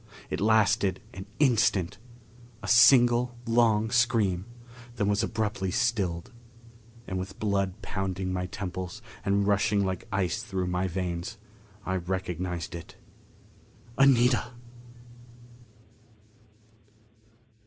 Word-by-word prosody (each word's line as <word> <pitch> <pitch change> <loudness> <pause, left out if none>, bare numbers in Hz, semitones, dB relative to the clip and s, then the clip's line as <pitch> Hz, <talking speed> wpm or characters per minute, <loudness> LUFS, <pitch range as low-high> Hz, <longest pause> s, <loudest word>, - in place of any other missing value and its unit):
It - - -2
lasted 105 -3 +3
an 95 +1 -8
instant 110 - +2 0.6
a - - -5
single 120 0 +5
long 115 -2 +2
scream; 115 -7 +2 0.5
then 100 -3 0
was 100 +1 +2
abruptly 110 -4 -2
stilled. 95 -7 -1 0.7
And 95 -4 -3
with 95 +1 -7
blood 100 -1 -1
pounding 95 -1 -3
my 90 0 -2
temples 95 +2 -6 0.2
and 100 0 +1
rushing 100 0 +2
like 95 -1 -4
ice 95 0 -1
through 95 -4 -3
my 90 +1 -1
veins, 90 -1 -4 0.5
I 95 0 -1
recognized 90 0 -4
it. 85 -1 -9 1.0
Anita! 125 -2 +4
100 Hz, 100 wpm, -27 LUFS, 95-110 Hz, 1.0 s, single